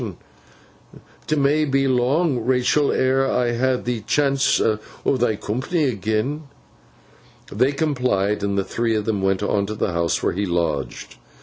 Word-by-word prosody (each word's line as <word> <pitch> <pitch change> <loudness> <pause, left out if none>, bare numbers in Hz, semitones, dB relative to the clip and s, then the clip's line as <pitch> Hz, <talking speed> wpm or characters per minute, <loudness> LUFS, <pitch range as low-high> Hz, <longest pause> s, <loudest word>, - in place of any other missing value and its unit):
'T 155 - +1
may 145 +2 +2
be 135 -2 +1
long, 130 +3 +1
Rachael, 130 +4 +2
ere 130 +1 +2
ever - - -1
I 120 -1 +1
ha 130 +1 +1
th' 120 -3 -4
chance 140 -1 +2
o' 110 -1 +1 0.4
thy 120 -3 +1
coompany 130 - -1
agen.' 110 +8 -2 1.0
They 125 +7 +2
complied, 125 -10 0
and 100 0 -1
the 100 - +1
three 115 +2 -1
went 100 -2 0
on 100 -1 0
to 110 - -4
the 105 - -1
house 85 0 0
where - - +1
he 100 +3 -2
lodged. 85 -6 -3
120 Hz, 145 wpm, -22 LUFS, 105-135 Hz, 1.0 s, may